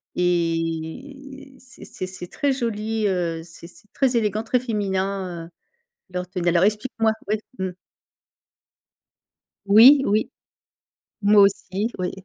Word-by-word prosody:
et 180 - -3
c'est 255 -1 -15
c'est 185 - -6
c'est 185 -1 -8
très 285 +7 -1
joli, 220 -3 -2
heu, 170 -3 -1
c'est 170 0 -14
c'est 195 +4 -16
très 260 -3 +1
élégant, 215 0 0
très 245 +2 +1
féminin, 195 -6 -3
heu, - - -18 0.7
leurs 180 0 -4
tenues. 175 -2 -2
Alors 175 +2 +3
explique-moi. 220 +1 0 0.2
Ouais 215 0 +1 0.2
mmh. 190 -1 -2 2.0
Oui, 240 +8 +8
oui. 210 +2 +1 0.9
Moi 205 0 +6
aussi, 200 +2 0
oui. 180 0 -2
200 Hz, 125 wpm, -23 LUFS, 180-230 Hz, 2.0 s, Oui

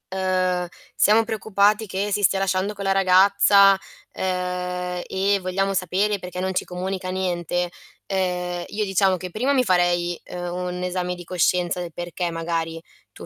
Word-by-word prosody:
Uhm: 185 -1 0 0.3
"Siamo 220 +2 +4
preoccupati 215 0 +1
che 200 +2 -3
si 210 - 0
stia 195 +1 +3
lasciando 195 +2 0
con 200 -1 -7
la 195 - +3
ragazza, 195 +1 +6 0.4
uhm, 180 -1 -3
e 195 +1 +1
vogliamo 195 +2 -1
sapere 195 +3 0
perché 180 0 -7
non 190 0 -1
ci - - 0
comunica 185 +1 -4
niente." 175 -1 -1 0.4
Uhm, 180 -2 -2
io 210 0 -2
diciamo 190 -1 +2
che 180 0 -7
primo 260 +8 0
mi 255 -2 +3
farei, 175 -2 +2
uhm, 175 0 -4
un 180 0 -4
esame 180 0 -2
di 175 -1 -10
coscienza 180 0 +1
del 170 -2 -6
perché, 175 0 -4
magari, 165 0 -3 0.3
tuo - - -11
185 Hz, 160 wpm, -23 LUFS, 180-195 Hz, 0.4 s, ragazza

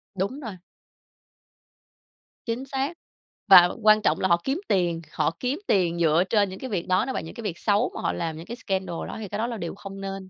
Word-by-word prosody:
Đúng 200 +9 -2
rồi. 220 -9 -7 1.9
Chính 235 +3 -3
xác. 270 +3 -2 0.5
Và 180 -2 +9
quan 215 0 +6
trọng 155 -5 +1
là 190 - +2
họ 170 -1 +3
kiếm 275 +5 -1
tiền, 175 -4 +1
họ - - 0
kiếm 260 +5 -1
tiền 175 -3 +2
dựa 165 +1 +4
trên 205 -2 +3
những 190 - -8
cái 260 - -6
việc 185 -6 -2
đó 185 +4 +2
nó 265 - -3
và - - -2
những 160 - -9
cái 235 - -7
việc 185 -5 -3
xấu 210 +3 +1
mà - - -5
họ - - 0
làm 165 -2 -3
những 165 - -9
cái 235 - -6
scandal 190 -6 -3
đó - - -6
thì 210 - -5
cái 205 - -4
đó 225 +2 -1
là 235 -2 -4
điều 170 -3 -5
không 195 -1 -9
nên. 195 -1 -6
195 Hz, 235 wpm, -25 LUFS, 175-230 Hz, 1.9 s, Và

